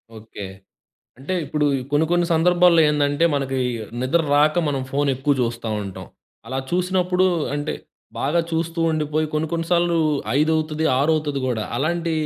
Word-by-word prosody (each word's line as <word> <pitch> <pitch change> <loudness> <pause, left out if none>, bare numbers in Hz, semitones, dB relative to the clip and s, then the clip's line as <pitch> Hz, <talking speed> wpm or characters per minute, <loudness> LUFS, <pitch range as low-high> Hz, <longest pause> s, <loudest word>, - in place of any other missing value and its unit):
Okay. 110 -2 -9 0.7
అంటే 150 +8 -4
ఇప్పుడు 150 0 0 0.2
కొన్ని 145 +2 +3
కొన్ని 175 0 +2
సందర్భాల్లో 175 0 +4
ఏందంటే 145 +2 +1
మనకి 135 -1 -1 0.5
నిద్రరాక 150 +2 +2
మనం 135 -2 -1
ఫోన్ 145 +1 0
ఎక్కువ 135 +3 0
చూస్తా 115 -1 -2
ఉంటాం. 100 -2 -8 0.4
అలా 130 +2 -3
చూసినప్పుడు 180 +1 +1 0.3
అంటే, 145 +1 -2 0.5
బాగా 155 +5 +1
చూస్తూ 165 +1 -2
ఉండిపోయి 155 0 -1
కొన్ని 155 +1 0
కొన్ని 165 -1 -1
సార్లు 175 -1 +2 0.4
ఐదవుతది 155 0 0
ఆరవుతుది 150 -1 0
గూడా. 115 -4 -1
అలాంటి 170 +4 -1
155 Hz, 130 wpm, -22 LUFS, 140-170 Hz, 0.7 s, సందర్భాల్లో